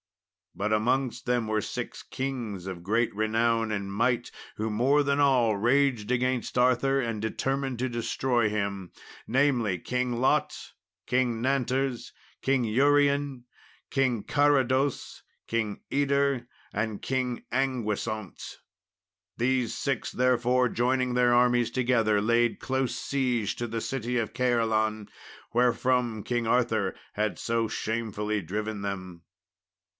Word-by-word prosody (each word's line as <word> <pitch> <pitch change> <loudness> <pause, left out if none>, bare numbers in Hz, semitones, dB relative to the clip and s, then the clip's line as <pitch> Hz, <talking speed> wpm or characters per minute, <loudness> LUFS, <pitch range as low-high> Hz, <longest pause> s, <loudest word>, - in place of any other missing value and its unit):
But 105 +2 -1
amongst 125 +4 0
them 120 -2 +1
were 110 0 0
six - - -5
kings 120 -9 -4
of 90 -3 -6
great 110 +5 +1
renown 115 +1 +1
and 100 -2 -3
might, 120 +3 0 0.3
who 110 +1 -2
more 130 +7 +3
than 140 0 +1
all 125 -6 +4
raged 120 0 +2
against 125 -1 0
Arthur 130 +2 +3
and 115 -4 -2
determined 135 +3 -2
to 130 - 0
destroy 120 -1 0
him, 100 -3 -3 0.4
namely, 125 -6 +2
King 125 +5 -1
Lot, 130 - 0 0.3
King 125 -2 +1
Nanters, 130 0 -1 0.3
King 135 -2 +1
Urien, 140 +2 +2 0.5
King 130 -6 +1
Carados, 140 -2 +1 0.3
King 110 -3 -2
Yder, 140 -3 +1 0.3
and 105 0 -2
King 130 -2 -2
Anguisant. 110 -6 -2 0.8
These 125 0 +1
six, 140 -2 -2
therefore, 125 0 +2
joining 125 +1 0
their 125 0 +3
armies 120 -1 +3
together, 120 -5 +2
laid 115 +2 +2
close 130 -2 -1
siege 125 -5 -1
to 120 - -3
the 115 0 -3
city 125 -1 -2
of 115 -3 -2
Caerleon, 110 -4 +1 0.5
wherefrom 125 -2 +1
King 120 -1 -1
Arthur 110 -5 +1 0.2
had 105 0 -1
so 115 -1 0
shamefully 110 -2 -2
driven 105 +4 -4
them. 95 -3 -5
120 Hz, 120 wpm, -27 LUFS, 110-130 Hz, 0.8 s, all